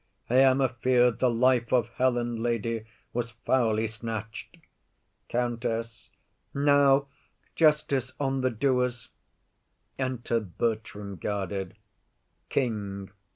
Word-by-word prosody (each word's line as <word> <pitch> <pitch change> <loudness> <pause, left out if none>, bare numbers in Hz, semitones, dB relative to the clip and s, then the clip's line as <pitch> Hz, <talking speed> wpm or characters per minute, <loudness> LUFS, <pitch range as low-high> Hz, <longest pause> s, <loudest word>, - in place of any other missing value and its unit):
_] 125 - +1
I - - +7
am 135 0 +5
afeard 125 -1 +2
the 130 - +3
life 120 0 +2
of 120 -3 +2
Helen, 120 -2 0
lady, 115 -1 -1 0.3
Was 120 -1 -3
foully 115 -4 +2
snatch'd. 110 -1 -6 0.7
COUNTESS. 115 -2 -2 0.5
Now, 140 -1 +4 0.5
justice 150 -5 +2
on 135 -2 0
the 130 - +2
doers! 125 0 0 0.9
Enter 125 -3 -1
Bertram, 105 -1 -3
guarded. 95 0 -3 0.7
KING. 100 -6 -2
120 Hz, 100 wpm, -27 LUFS, 110-130 Hz, 0.9 s, I